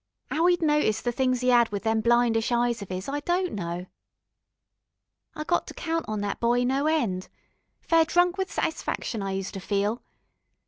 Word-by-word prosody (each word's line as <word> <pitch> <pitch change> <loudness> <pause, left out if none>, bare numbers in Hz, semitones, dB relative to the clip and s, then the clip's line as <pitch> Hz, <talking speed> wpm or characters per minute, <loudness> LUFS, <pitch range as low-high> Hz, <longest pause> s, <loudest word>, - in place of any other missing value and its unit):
'Ow 325 +3 +2
'e'd 350 -1 +2
noticed 295 -8 +2
the 240 - 0
things 255 0 0
'e 250 - +4
'ad 240 -2 +5
with 205 -2 -4
them 220 0 +1
blindish 235 0 +2
eyes 240 -1 +1
of 200 - -8
'is, 185 0 -4
I 285 +1 -2
don't 350 +4 -1
know. 175 -2 -4 1.5
I 305 - -4
got 345 +3 0
to - - -9
count 330 -1 -2
on 215 -1 -2
that 205 -1 -3
boy 240 +1 +2
no 270 +4 +1
end. 225 -13 0 0.5
Fair 330 -1 +3
drunk 350 +2 +2
with 385 0 -3
satisfaction, 235 -7 -2
I 195 0 -3
use 190 0 -3
to 195 - -6
feel. 205 +4 -1
240 Hz, 185 wpm, -26 LUFS, 210-310 Hz, 1.5 s, ad